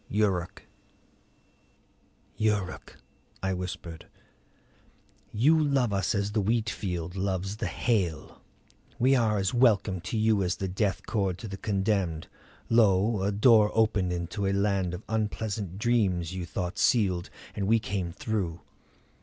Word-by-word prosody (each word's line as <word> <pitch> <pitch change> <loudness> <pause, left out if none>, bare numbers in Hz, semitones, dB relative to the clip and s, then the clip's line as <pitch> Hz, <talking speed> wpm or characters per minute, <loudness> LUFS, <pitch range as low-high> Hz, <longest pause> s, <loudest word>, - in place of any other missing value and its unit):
YURUK 95 -4 -1 1.7
"Yuruk," 105 -4 -2 0.5
I 95 0 0
whispered, 90 -2 -6 1.2
"you 150 +9 +4
love 135 -7 +1
us 95 +1 0
as 100 0 -1
the 105 0 +1
wheat 110 +2 0
field 90 -3 -4
loves 95 +1 -2
the - - -2
hail; 95 -10 -1 0.6
we 130 +3 +3
are 110 -4 +2
as 95 -1 0
welcome 105 -7 +3
to 95 +6 -4
you 110 -2 +3
as 90 -1 0
the 95 - -3
death 95 +1 -1
cord 100 -5 -1
to 115 - -8
the 95 - -6
condemned. 95 -5 -1 0.4
Lo, 105 -2 +3
a 100 +2 +1
door 105 0 +5
opened 105 -5 +2
into 90 +3 -3
a 95 - +1
land 100 -3 0
of 95 - -9
unpleasant 105 -3 -3
dreams 100 -7 +1
you 90 -2 -5
thought 90 +2 -4
sealed, 95 -7 +2 0.3
and 100 -2 -2
we 115 +2 +5
came 100 -5 -3
through. 90 -4 -3
100 Hz, 135 wpm, -28 LUFS, 90-110 Hz, 1.7 s, door